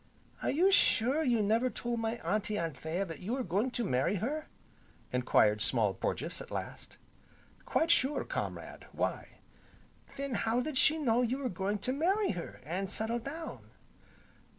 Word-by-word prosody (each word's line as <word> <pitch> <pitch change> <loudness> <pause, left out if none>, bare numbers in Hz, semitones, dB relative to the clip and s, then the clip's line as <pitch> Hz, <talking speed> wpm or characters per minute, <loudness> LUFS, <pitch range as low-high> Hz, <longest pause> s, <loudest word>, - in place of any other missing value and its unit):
"Are - - 0
you 315 +6 +2
quite 390 +1 +6
sure 275 - +4
you 240 -6 +2
never 225 +5 +2
told 240 -1 -3
my 225 0 -1
Auntie 210 +2 0
Anthea 165 +3 -2
that 165 -5 -7
you 210 +6 -3
were 260 0 -1
going 205 +6 0
to 245 -1 -2
marry 135 - +1
her?" 280 - -2 0.7
enquired 105 -4 +3
Small 110 -5 +2
Porges, 150 - -3
at - - -9
last. - - -6 0.7
"Quite 325 +1 +2
sure, 290 -3 +3
comrade, - - -5
why?" - - -3 0.8
"Then 275 -1 -3
how 230 +1 +1
did 260 +1 0
she 310 - +5
know 245 -6 +2
you 250 +2 0
were 270 -2 -2
going 195 +3 -1
to 255 - +1
marry 380 +8 +2
her, 175 -3 -6
an' 185 +5 -2
settle 220 +4 -1
down?" 310 +7 -7
230 Hz, 165 wpm, -32 LUFS, 185-270 Hz, 0.8 s, quite